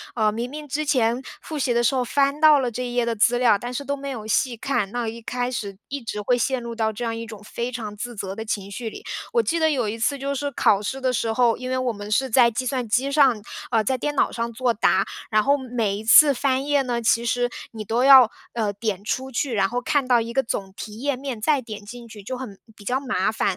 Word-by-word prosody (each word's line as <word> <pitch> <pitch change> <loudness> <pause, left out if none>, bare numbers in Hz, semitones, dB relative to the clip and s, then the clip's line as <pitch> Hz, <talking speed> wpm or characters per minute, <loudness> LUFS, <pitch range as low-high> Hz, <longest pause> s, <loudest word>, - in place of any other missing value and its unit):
呃， 215 -2 +2
明 235 +3 -4
明 300 +1 -8
之 300 +3 -2
前 250 -4 +1 0.2
复 310 -2 -5
习 250 -2 +1
的 240 - +2
时 255 - +3
候 255 -1 +1
翻 280 +3 +1
到 310 -1 +7
了 250 -2 -1
这 250 +3 -4
一 245 - -6
页 240 -1 +2
的 230 -1 -1
资 235 +3 +3
料， 240 -4 +4
但 240 +5 -5
是 280 +3 -4
都 280 +1 -1
没 280 0 -6
有 225 -5 -6
细 235 +3 0
看， 230 -5 -1
那 240 0 -2
一 230 +1 -6
开 245 +2 -3
始 200 -5 -5
一 280 0 -4
直 225 -2 -5
会 245 - +3
陷 250 +1 -1
入 235 0 -5
到 220 -1 0
这 220 +3 -6
样 225 0 -2
一 230 0 -6
种 215 -2 -10
非 235 +3 -4
常 215 -4 -6
自 240 +2 -6
责 195 -1 -5
的 220 - -5
情 200 -2 -4
绪 225 +2 -5
里。 - - -11 0.3
我 465 -1 +3
记 335 0 0
得， 315 - +3
有 255 -7 0
一 225 +2 -4
次 280 +5 +1
就 275 +1 -3
是 285 +1 -2
考 210 -6 +2
试 265 +6 -4
的 255 -1 0
时 225 -1 0
候， 235 0 +3
因 255 0 -6
为 255 - 0
我 255 -2 -1
们 205 0 -8
是 265 +3 +1
在 240 -1 +6
计 250 +3 -3
算 250 -2 -2
机 265 +6 +1
上， 270 -6 +4 0.3
呃， 225 -2 +2
在 260 +5 0
电 295 +3 -3
脑 - - +2
上 235 0 -3
做 245 0 +1
答， 195 -2 +2 0.2
然 215 -1 +3
后 280 +1 +4
每 235 -6 -2
一 210 - -7
次 285 +6 +8
翻 265 +1 0
页 290 -1 +2
呢， 240 -2 -2
其 230 +1 +2
实 245 +1 +1 0.2
你 220 -2 -6
都 230 +4 0
要， 265 -4 +9 0.2
呃， 220 -3 -1
点 205 -2 -3
出 260 +5 -2
去， 255 +1 -1
然 195 -3 +2
后 245 +3 -3
看 285 -2 0
到 245 -2 +4
一 230 +1 -5
个 270 - +2
总 195 -4 -4
题 215 +1 -8
页 285 0 0
面， 260 -5 -5
再 285 +2 +2
点 215 -3 -8
进 240 +2 -10
去， 215 -2 -11
就 255 +5 -5
很 235 -7 -8 0.2
比 205 - -15
较 255 +5 0
麻 220 -6 0
烦。 - - -3
240 Hz, 295 characters per minute, -23 LUFS, 220-265 Hz, 0.3 s, 要